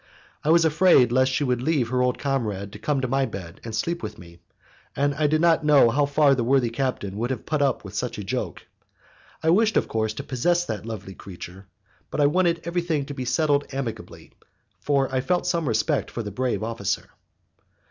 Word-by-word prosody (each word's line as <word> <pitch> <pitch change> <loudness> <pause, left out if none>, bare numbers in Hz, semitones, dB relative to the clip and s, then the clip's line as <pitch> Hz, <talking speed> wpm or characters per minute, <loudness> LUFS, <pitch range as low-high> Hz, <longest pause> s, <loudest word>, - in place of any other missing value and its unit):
I 150 - 0
was 165 0 +5
afraid 160 -6 +5
lest 130 +1 +3
she 145 +2 0
should 125 -2 0
leave 135 -4 +1
her 125 0 +1
old 125 0 +1
comrade 110 -8 -2
to 105 - -9
come 140 +3 0
to 130 - -1
my 135 +1 +1
bed 85 -4 -9
and 115 -2 -5
sleep 170 +8 -2
with 105 -1 -6
me, 85 0 -14 0.6
and 145 +1 +1
I 150 +1 +1
did 155 +1 +1
not 165 -2 +4
know 145 -6 +5
how 140 +3 +2
far 140 0 +4
the 125 -3 0
worthy 125 -1 +2
captain 115 -6 -3
would 120 +3 -1
have 130 -4 -4
put 155 -2 -1
up 135 -3 +1
with 95 - -9
such 120 +4 -3
a 105 - -5
joke. 100 -4 -4 0.8
I 160 - +4
wished, 215 +3 +3
of - - +1
course, 110 -1 -1
to - - -5
possess 175 +7 0
that 110 -4 -5
lovely 100 -4 -6
creature, 95 0 -10 0.4
but - - -4
I 145 - +5
wanted 170 +2 +2
everything 170 -4 -1
to 145 - -7
be 130 -2 -5
settled 145 +2 +1
amicably, 135 -4 -6 0.5
for 140 -2 +1
I 130 - +1
felt 180 +6 0
some 170 -4 0
respect 110 -2 0
for 115 - -5
the 105 - -6
brave 115 -1 -1
officer. 115 -4 -3
130 Hz, 210 wpm, -24 LUFS, 110-150 Hz, 0.8 s, was